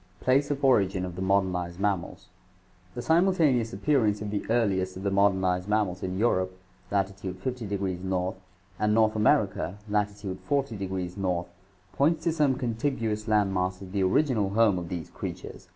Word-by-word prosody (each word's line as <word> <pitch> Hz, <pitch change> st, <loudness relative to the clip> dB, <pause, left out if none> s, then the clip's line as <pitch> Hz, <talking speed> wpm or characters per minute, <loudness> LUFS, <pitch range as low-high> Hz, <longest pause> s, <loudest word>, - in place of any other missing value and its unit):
Place 135 Hz, +3 st, +2 dB
of 140 Hz, -1 st, -1 dB
Origin 95 Hz, -7 st, +3 dB
of 90 Hz, -1 st, -7 dB
the 95 Hz, -, -5 dB
Modernized 95 Hz, -2 st, 0 dB
Mammals. 100 Hz, -3 st, -2 dB, 0.3 s
— 90 Hz, 0 st, -32 dB
The 120 Hz, -, -3 dB
simulta 175 Hz, +4 st, +3 dB
neous 115 Hz, -2 st, -1 dB
appearance 105 Hz, -1 st, +1 dB
of 105 Hz, -1 st, -5 dB
the 105 Hz, -, -2 dB
earliest 95 Hz, -6 st, +1 dB
of 95 Hz, -, -7 dB
the 100 Hz, -, 0 dB
modernized 95 Hz, -1 st, +2 dB
mammals 105 Hz, -4 st, 0 dB
in 95 Hz, 0 st, -3 dB
Eu 115 Hz, +4 st, +3 dB
rope 95 Hz, -3 st, -1 dB, 0.3 s
(lat. 100 Hz, -1 st, +1 dB
500 100 Hz, +4 st, -5 dB
N.) 95 Hz, -1 st, -2 dB, 0.5 s
and 105 Hz, 0 st, +2 dB
North 110 Hz, -1 st, +3 dB
America 105 Hz, -3 st, +1 dB
(lat. 105 Hz, 0 st, +1 dB
400 105 Hz, +1 st, -3 dB
N.) 90 Hz, -1 st, -2 dB, 0.5 s
points 155 Hz, +7 st, +2 dB
to 170 Hz, -, +2 dB
some 150 Hz, -5 st, +2 dB
contiguous 115 Hz, -3 st, -2 dB
land 105 Hz, -3 st, +2 dB
mass 90 Hz, 0 st, -1 dB
as 95 Hz, -, -10 dB
the 100 Hz, 0 st, -1 dB
original 105 Hz, +1 st, +2 dB
home 105 Hz, -2 st, +3 dB
of 85 Hz, -1 st, -7 dB
these 85 Hz, -4 st, -5 dB
creatures. -, -, -7 dB
100 Hz, 170 wpm, -27 LUFS, 95-115 Hz, 0.5 s, Origin